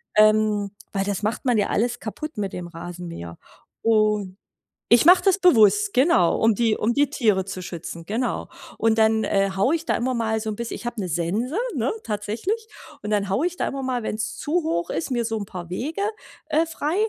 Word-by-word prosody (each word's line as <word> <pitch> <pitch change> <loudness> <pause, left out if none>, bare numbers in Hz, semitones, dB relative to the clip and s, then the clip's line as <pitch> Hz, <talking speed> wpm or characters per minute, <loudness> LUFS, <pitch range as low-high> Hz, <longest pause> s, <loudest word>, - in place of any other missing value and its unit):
Ähm, 215 -1 +4 0.2
weil 195 0 0
das 205 0 -2
macht 225 +5 -2
man 245 -3 +3
ja 205 - +2
alles 240 +3 0
kaputt 280 +5 -6
mit 200 -2 -3
dem 175 -1 -5
Rasenmäher. 170 - -8 0.4
Und 210 -4 +2 0.6
ich 235 - +6
mach 360 +2 +8
das 390 -1 +3
bewusst, 365 - +5
genau, 250 - +4
um 225 0 +5
die 225 0 +2
um 230 +3 +1
die 285 0 +2
Tiere 205 -6 +1
zu 190 -1 -6
schützen, 170 -1 -7
genau. 235 +6 -2 0.3
Und 225 0 +2
dann, 220 0 +3
äh, 195 0 +2
haue 200 +11 +2
ich 330 0 -5
da - - +1
immer 255 +2 -1
mal 220 -1 0
so 220 - -3
'n 215 - -3
biss 235 -1 -4
ich - - -6
habe 240 -1 -4
'ne 185 - -3
Sense, 190 - -1 0.2
ne, 245 - 0
tatsächlich. 230 - -3 0.4
Und 210 - -4
dann 200 -2 +1
haue 255 - +1
ich 360 - -6
da - - -1
immer 275 0 -5
mal, 255 -2 -2
wenn's 215 0 -3
zu 335 +3 0
hoch 170 - -1
ist, 165 - -2
mir 240 -2 +1
so 225 0 -2
'n 205 - -4
paar 175 -3 -8
Wege, 290 - -3 0.5
äh, 315 +2 +3
frei, 320 0 -3
220 Hz, 210 wpm, -23 LUFS, 195-255 Hz, 0.6 s, mach